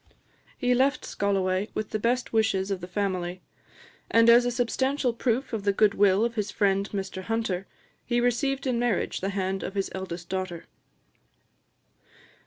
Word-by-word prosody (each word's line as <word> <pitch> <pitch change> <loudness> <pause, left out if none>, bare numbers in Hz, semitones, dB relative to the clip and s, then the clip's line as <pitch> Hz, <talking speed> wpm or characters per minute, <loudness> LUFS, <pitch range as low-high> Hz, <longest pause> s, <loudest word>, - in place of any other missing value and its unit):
He 250 0 +2
left 265 +3 +2
Scolloway 195 0 0
with 215 - -3
the 215 - -1
best 240 +3 0
wishes 210 -3 +1
of 190 -2 -2
the 180 - -6
family; 185 -2 -2 0.7
and 230 0 +6
as 240 +1 +6
a - - +2
substantial 250 +2 0
proof 245 +2 -1
of 220 - -1
the 200 0 +2
goodwill 200 0 +3
of 235 - -2
his 210 -2 -2
friend 195 -1 +1
Mr 195 -1 -4
Hunter, 220 -5 -2 0.4
he 240 0 0
received 270 +3 0
in 250 -3 0
marriage 240 -5 0
the 195 - -1
hand 195 -1 -2
of 195 - -5
his 195 -1 -1
eldest 175 -2 -6
daughter. 185 -2 -4
205 Hz, 160 wpm, -27 LUFS, 190-240 Hz, 0.7 s, and